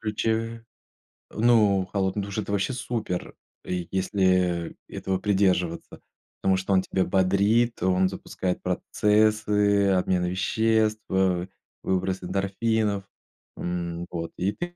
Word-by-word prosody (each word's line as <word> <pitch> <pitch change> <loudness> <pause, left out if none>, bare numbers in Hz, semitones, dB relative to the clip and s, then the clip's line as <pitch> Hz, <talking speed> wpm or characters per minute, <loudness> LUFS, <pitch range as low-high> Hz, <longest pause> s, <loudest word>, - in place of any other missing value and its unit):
ключе. 115 +1 -2 0.7
Ну, 105 -4 +3
холодный 100 0 0
душ- 100 +1 -6
это 100 -1 -3
вообще 100 +5 0
супер. 110 -7 -4 0.3
И 90 -2 -3
если 90 -3 +1
этого 95 -1 -2
придерживаться, 95 -4 0 0.4
потому 95 -1 +3
что 95 +1 -1
он 95 - +4
тебя 95 0 -1
бодрит, 100 +5 +2
он 95 0 +3
запускает 90 -1 -4
процессы, 105 -1 +2
обмен 90 -1 +1
веществ, 110 +4 +1
ва 95 -1 +1 0.4
выброс 95 0 -1
эндорфинов. 100 +2 0 0.5
М, 85 -1 -4
вот 85 -1 -4
и 95 +3 0
ты 175 0 -6
95 Hz, 115 wpm, -25 LUFS, 90-105 Hz, 0.7 s, он